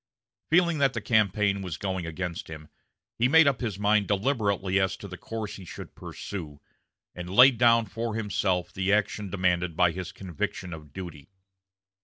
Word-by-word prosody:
Feeling 170 -1 +3
that 135 -2 +3
the - - -2
campaign 105 -2 +2
was 90 -5 -5
going 95 -3 -3
against 90 +4 -5
him, 80 -1 -10 0.5
he 120 - +4
made 160 +4 +6
up 135 -3 +1
his 110 -6 -3
mind 105 0 +2
deliberately 100 -3 +1
as 95 -1 0
to 100 - -9
the 90 - -8
course 110 +2 -6
he 95 - -10
should 90 - -9
pursue, 80 -8 -7 0.5
and 90 0 -7
laid 125 +4 +6
down 115 -2 +5
for 115 0 -4
himself 95 -4 -1
the 95 +1 0
action 105 -1 0
demanded 90 -3 0
by 90 -1 +4
his 90 +1 -6
conviction 90 0 -5
of 75 -3 -11
duty. 85 -3 -9
100 Hz, 170 wpm, -27 LUFS, 90-110 Hz, 0.5 s, made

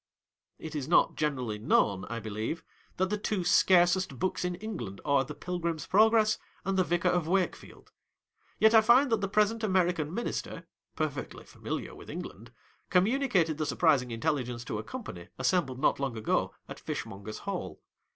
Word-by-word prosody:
It 160 0 -8
is 145 -3 -3
not 170 - +4
generally 130 -8 -2
known, 100 -3 +2
I 115 +2 -5
believe, 110 +8 -4 0.3
that 190 +1 0
the 210 - -1
two 205 -3 -1
scarcest 175 -3 +4
books 185 +8 -1
in 180 0 -1
England 175 - -6
are 140 -2 +3
The 135 - -8
Pilgrim's 170 -4 -3
Progress 215 +1 +4 0.3
and 195 0 0
The 185 - +3
Vicar 175 +1 +1
of 175 -3 0
Wake 185 0 +1
field. - - -16 0.7
Yet 220 +1 +5
I 220 - +8
find 245 +4 +5
that 225 -2 +2
the 195 - 0
present 215 +3 +1
American 180 -6 +1
Minister 235 +7 -4 0.3
(perfectly - - -4
familiar - - -6
with - - -12
England) - - -8 0.4
communicated 190 - +2
the 155 - 0
surprising 145 -7 +2
intelligence 120 -1 -2
to 105 - -3
a - - -5
company, 210 - -8
assembled 130 0 +1
not 135 - +2
long 135 -4 -2
ago, 110 - 0
at - - -9
Fishmongers' 100 +2 -6
Hall. - - -4
175 Hz, 165 wpm, -29 LUFS, 130-195 Hz, 0.7 s, I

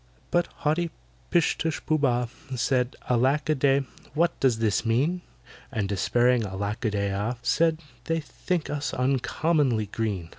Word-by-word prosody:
But 175 0 +2
haughty 165 +2 0 0.4
PISH 175 -4 +2
TUSH 160 -1 -2
POOH 155 - +2
BAH 125 -3 +2 0.3
Said, 125 +1 +1
"ALACK 130 +6 +2
A - - +5
DEY, 140 -1 +3 0.3
what 170 +2 +1
does 130 -4 +3
this 110 -2 +1
mean?" 140 +11 +1 0.5
And 105 -6 -1
despairing 120 +5 +2
ALACK 100 +4 -3
A - - +3
DEY 100 -1 -1
AH 105 +5 -1
Said, 160 +5 +2 0.2
"They 165 0 0
think 160 +2 -3
us 145 0 -2
uncommonly 130 -1 +1
green! 100 -5 -3
130 Hz, 150 wpm, -26 LUFS, 115-155 Hz, 0.5 s, A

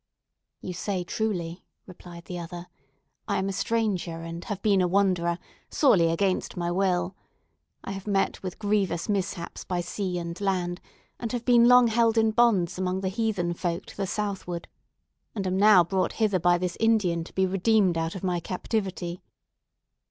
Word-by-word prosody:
"You 180 - -5
say 185 +1 -2
truly," 175 -3 -3 0.2
replied 175 -2 -12
the 180 -1 -6
other; 175 +1 -7 0.6
"I - - 0
am 190 - -1
a - - -2
stranger, 185 -7 -1
and 165 +1 -6
have 205 -3 -4
been 200 -3 +4
a 180 - +2
wanderer, 180 -3 +2 0.3
sorely 195 - +4
against 185 +2 -1
my 175 0 -1
will. 185 0 0 0.7
I - - -5
have 195 +1 -7
met 195 -1 0
with 185 -2 -6
grievous 200 -5 0
mishaps 190 -4 -3
by 180 -1 -2
sea 180 +1 -3
and 170 +2 -5
land, 180 -3 -1 0.4
and 230 - -4
have 240 -1 -3
been 240 -1 +6
long 250 0 +7
held 230 0 +2
in 220 0 +4
bonds 200 -7 +2
among 185 0 -1
the 190 - -1
heathen 195 -4 -1
folk 170 -1 -3
to - - -13
the 195 -1 -1
southward; 195 -4 -3 0.7
and 200 -3 -3
am 185 0 0
now 205 -3 +7
brought 185 +2 -1
hither 210 -4 +1
by 175 +1 +4
this 180 0 -3
Indian 205 -7 +2
to - - -13
be 190 - +2
redeemed 195 0 +2
out 165 +1 -2
of 190 - -7
my 180 -2 0
captivity. 185 -1 -3
185 Hz, 175 wpm, -26 LUFS, 175-205 Hz, 0.7 s, long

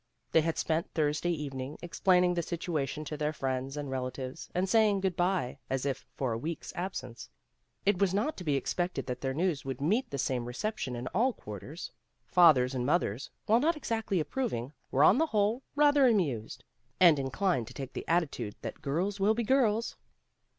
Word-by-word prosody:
They 160 - +5
had 165 +1 -1
spent 160 +1 -1
Thursday 150 +2 +1
evening 140 -3 -4
explaining 180 +1 +3
the 175 - 0
situation 155 -3 -3
to 150 - -4
their 150 0 -1
friends 135 0 -3
and 145 -1 -3
relatives 130 0 -4
and 185 +2 +1
say 220 +1 +5
ing 200 -1 +1
good 190 -2 -1
by 175 -7 0
as 135 0 -1
if 135 -2 -3
for 130 -4 -1
a 115 - -3
week's 160 +6 -5
absence. 125 - -5 0.6
It 200 -2 +3
was 200 -3 +3
not 210 +11 0
to 185 - -6
be 150 -4 +1
expected 175 +6 -1
that 125 - -4
their 130 -1 -2
news 165 -3 0
would 135 -2 -4
meet 205 - +1
the 140 - -4
same 125 -2 -1
reception 130 - -3
in 120 +1 -5
all 240 +6 +2
quarters. 115 - -8 0.3
Fathers 140 -8 +5
and 125 -2 -1
mothers, 135 - 0 0.2
while 225 +2 +4
not 320 +4 +2
exactly 225 - -1
approving, 150 - -2 0.2
were 140 - +3
on 245 - +6
the 320 - +3
whole 215 +1 +1
rather 290 -2 +5
amused, 145 - 0 0.4
and 170 -5 +7
inclined 135 - 0
to 125 - -10
take 135 -1 -6
the - - -6
attitude 145 -11 0
that - - -6
girls 175 +8 -1
will 210 +3 +3
be 235 - 0
girls. 230 -2 +2
160 Hz, 190 wpm, -30 LUFS, 135-195 Hz, 0.6 s, and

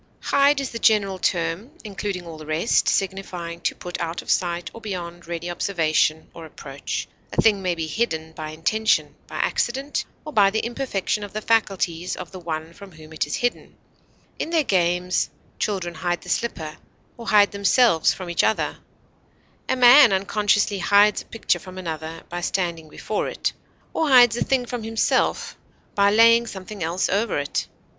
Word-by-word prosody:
Hide 280 0 +3
is 275 - -3
the 230 - -5
general 200 -5 +2
term, 170 +6 -1
including 200 -3 -4
all 165 -2 -9
the 155 - -10
rest, 155 +8 +1
signifying 180 -3 -3
to - - -1
put 175 0 -6
out 165 0 -3
of - - -2
sight 175 -1 -1
or 230 - -11
beyond 175 -5 -6
ready 170 0 -4
observation 160 -3 0
or 165 - -10
approach; 140 -2 -6 0.2
a - - -3
thing 210 -3 +4
may 180 -2 0
be 165 -1 -3
hidden 160 -3 -2
by 155 -1 -7
intention, 215 +8 +1
by - - -10
accident, 270 +4 -1 0.2
or 305 - -7
by 200 -2 +5
the 220 +2 -1
imperfection 235 -4 -2
of 205 - -8
the 215 - -2
faculties 190 -6 0
of 180 - -8
the 185 - -8
one 160 -1 -5
from 195 0 -13
whom 155 0 -13
it 155 - -1
is 150 - -2
hidden; 245 0 -2 0.6
in - - -2
their 330 -2 +2
games, 180 -4 +1 0.3
children 185 -4 -2
hide 175 +1 -2
the - - -11
slipper, 160 -10 -2 0.4
or 235 -1 -10
hide 205 -1 +5
themselves 200 - +3
from 185 - -6
each 170 -1 +1
other; 220 - 0 0.9
a 260 - +2
man 250 0 +8
unconsciously 205 +1 +1
hides 205 +3 +4
a - - -15
picture 225 - -1
from 185 0 -11
another 160 -2 -6
by 175 0 -5
standing 170 -3 -2
before 210 +7 -3
it, - - -2 0.4
or 320 -2 0
hides 245 -4 +7
a - - 0
thing 260 -2 +1
from 245 -1 -5
himself 225 0 0 0.4
by 200 0 +4
laying 230 +2 +5
something 195 0 -8
else 170 +3 0
over 205 +3 0
it. 145 0 -2
190 Hz, 175 wpm, -23 LUFS, 170-220 Hz, 0.9 s, man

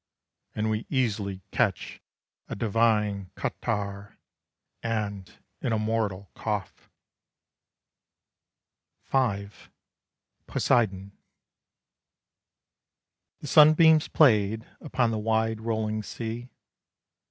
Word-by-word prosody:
And 110 0 0
we 110 +1 -3
easily 105 -8 -1
catch 100 -7 -1 0.5
a - - -5
divine 105 -3 +1
catarrh, 100 0 -4 0.6
And 105 -4 -3 0.3
an 120 - -1
immortal 110 -3 -1
cough." 105 -3 -5 2.2
V. 100 -7 +1 1.0
POSEIDON. 100 -5 +1 2.3
The 150 - -7
sunbeams 155 +1 +6
played 110 -5 +3
Upon 120 -3 0
the 110 - -2
wide 110 0 0
rolling 110 -1 -1
sea. 115 +3 -6
110 Hz, 75 wpm, -27 LUFS, 100-115 Hz, 2.3 s, sunbeams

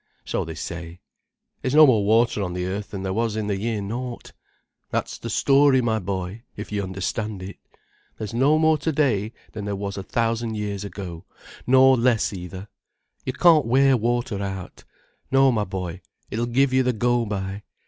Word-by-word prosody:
So - - -1
they 80 0 -7
say. 85 +1 -7 0.6
There's 130 +2 -1
no 155 0 +10
more 115 -7 +4
water 110 +1 +3
on 90 -3 -3
the 90 0 -2
earth 100 +2 -4
than 95 -2 -6
there 95 -1 -2
was 115 0 0
in 110 -1 -2
the 105 -1 -1
year 110 -1 -2
naught. 120 +4 -5 0.6
That's - - -3
the - - -6
story, 140 -1 +4
my 115 -3 +1
boy, 95 +2 -4 0.2
if 105 - -7
you 105 -1 -1
understand 95 +2 -3
it. 95 +2 -8 0.6
There's 110 +1 -5
no 135 +6 +4
more 160 -1 +3
to 160 +3 -1
day 120 -9 +1 0.2
than 105 -2 -6
there 100 -1 -2
was 100 0 -4
a - - -3
thousand 115 +3 -1
years 105 -2 -3
ago—nor 95 -5 -7 0.4
no 130 +1 +7
less 120 -4 +2
either. 95 +1 -7 0.6
You 130 - -2
can't 155 -2 +5
wear 135 +2 +5
water 120 -3 -1
out. 95 -2 -6 0.4
No, 135 0 +5
my 105 -3 0
boy: 95 -2 -5 0.3
it'll 115 +3 -1
give 130 +2 +2
you 130 - +4
the 125 -1 +1
go 120 +1 +1
by. 100 -1 -4
110 Hz, 185 wpm, -24 LUFS, 95-125 Hz, 0.6 s, no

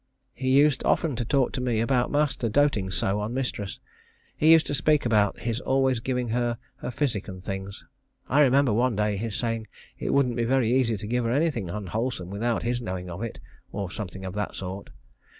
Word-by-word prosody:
He 130 0 -2
used 140 +1 +4
often 155 -6 +1
to 120 - -1
talk 135 +2 +1
to 130 - -2
me 120 -3 0
about 125 +2 +2
master 145 -5 +1
doting 110 -7 +2
so 95 +2 0
on 105 +4 -3
mistress. 120 -7 -3 0.6
He 155 +2 +5
used 165 -1 +7
to - - -3
speak 150 0 +2
about 105 -3 +2
his 115 0 -1
always 130 -2 +1
giving 125 0 -2
her 120 0 0 0.2
her - - -5
physic 120 -5 -1
and 95 -2 -7
things. 95 +1 -6 0.4
I 140 - +2
remember 135 -3 +4
one 120 +1 +2
day 105 0 +1
his 105 +1 -3
saying 115 -1 -2 0.3
it - - -2
wouldn't 125 -4 +2
be 120 - +1
very 120 -1 +2
easy 120 -4 +2
to 100 - -7
give 120 +3 0
her 115 - 0
anything 135 - 0
unwholesome 105 0 -3
without 115 +3 -1
his 120 +1 -1
knowing 90 -4 -5
of 85 +4 -6
it, 115 -3 -5 0.3
or 100 -3 -4
something 95 -2 -6
of 95 - -5
that 105 0 -3
sort. 95 +1 -6
115 Hz, 205 wpm, -26 LUFS, 105-130 Hz, 0.6 s, used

